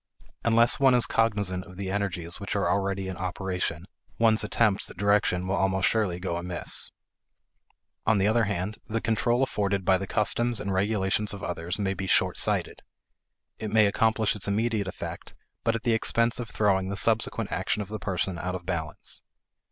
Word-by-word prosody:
Unless 115 +1 +4
one 135 -2 +5
is 120 - +5
cognizant 100 -5 +1
of 90 +1 -13
the 95 -1 -4
energies 90 -4 -1
which 100 +1 -4
are 100 - +1
already 100 -1 -1
in 95 -1 -5
operation, 90 -2 -3 0.3
one's 110 -1 +4
attempts 105 -1 +2
at - - -12
direction 100 -2 +2
will 95 - -1
almost 95 -1 +2
surely 100 -6 0
go 90 -2 -3
amiss. 85 0 -2 1.2
On 110 -1 +4
the 100 +1 +2
other 110 +1 +3
hand, 100 +1 -3
the 115 +1 -1
control 120 +3 +1
afforded 100 -6 -1
by 95 0 +4
the 95 - -5
customs 120 +3 +1
and 100 -2 -3
regulations 100 +1 0
of 100 - -10
others 85 +1 -3
may 100 -2 -1
be 95 0 -5
short - - +2
sighted. - - +1 0.8
It 110 - -4
may 110 0 +5
accomplish 110 0 +2
its 105 - -1
immediate 105 0 0
effect, 90 - -7 0.3
but 115 - +1
at 115 - -4
the 120 -2 +2
expense 115 +1 +1
of 120 -2 -5
throwing 95 -3 +1
the 100 - -3
subsequent 115 -1 +2
action 100 +3 -1
of - - -12
the 110 +2 -6
person 95 -2 -2
out 90 +1 -3
of 90 -1 -7
balance. 80 -4 -2
100 Hz, 185 wpm, -27 LUFS, 95-110 Hz, 1.2 s, one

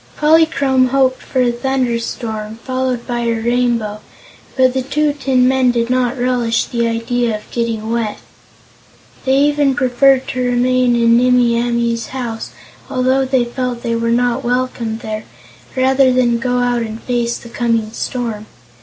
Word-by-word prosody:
Polychrome 300 -4 +3
hoped 260 0 +1
for 260 - -1
a 240 - +2
thunder 250 -1 -1
storm, 220 -2 -5
followed 255 -2 -2
by 240 -1 -2
her 230 -1 0
Rainbow, 235 -3 0 0.6
but 255 -1 +4
the 260 - 0
two 290 +3 0
tin 265 -3 +1
men 260 -1 +3
did 235 0 0
not 255 0 +1
relish 245 -2 0
the 235 -1 -1
idea 230 0 -1
of 210 - -17
getting 225 -2 -2
wet. 230 -3 -1 1.1
They 265 0 +3
even 290 -2 +2
preferred 265 0 +3
to 255 - -2
remain 250 0 +2
in 230 0 +4
Nimmie 250 -1 +3
Amee's 235 -1 -1
house, 240 -4 -5 0.4
although 260 +1 +1
they 260 -2 +1
felt 245 -1 -4
they 230 -1 -1
were 230 0 -1
not 245 +2 +1
welcome 245 -2 -2
there, 215 -1 -5 0.5
rather 260 0 +3
than 240 -2 +2
go 250 +1 -1
out 245 -1 +1
and 220 -1 -5
face 240 -1 -1
the 235 - -12
coming 230 -3 -1
storm. 230 -3 -4
245 Hz, 155 wpm, -17 LUFS, 235-260 Hz, 1.1 s, but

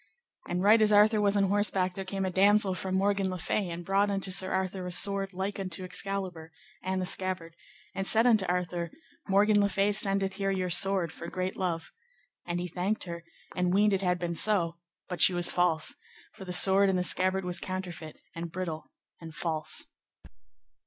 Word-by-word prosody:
And 180 +1 -1
right 215 +2 +5
as 215 0 +4
Arthur 210 +1 +5
was 205 0 +2
on 200 - +3
horseback 195 -2 0
there 195 - -5
came 195 0 -3
a 185 - -2
damosel 200 +1 +3
from 185 +1 -4
Morgan 195 0 +1
le 185 - -4
Fay, 185 +2 -2
and 170 0 -7
brought 195 +2 +2
unto 195 -1 -2
Sir 185 0 0
Arthur 190 -1 -2
a - - -5
sword 195 +2 +1
like 195 +2 -4
unto 185 -1 -4
Excalibur, 185 -3 -5 0.3
and 190 0 -2
the 185 - -2
scabbard, 180 -3 -2 0.4
and 195 0 -3
said 225 +2 +3
unto 220 -5 +4
Arthur, 175 -1 -2 0.4
Morgan 205 +1 +3
le 200 - +2
Fay 200 +1 +1
sendeth 195 -2 0
here 195 -1 -1
your 185 -2 -2
sword 190 -2 +3
for 170 - -9
great 185 +1 -4
love. 175 -4 -3 0.6
And 175 0 -2
he 180 - -3
thanked 185 +5 -2
her, 170 -1 -7 0.3
and 180 0 0
weened 205 0 +3
it 195 - 0
had 180 -2 +1
been 175 -1 -3
so, 170 -2 +1 0.3
but 180 -3 -5
she 185 - +6
was 175 0 +3
false, 165 -3 +1 0.4
for 190 - -11
the 180 - -6
sword 190 +2 +7
and 190 - +1
the 180 - 0
scabbard 185 +1 +1
was 180 0 -1
counterfeit, 175 -5 -6 0.2
and 170 0 -6
brittle, 170 -3 -5 0.3
and 160 -2 -11
false. 160 -4 -3
185 Hz, 195 wpm, -28 LUFS, 175-195 Hz, 0.6 s, sword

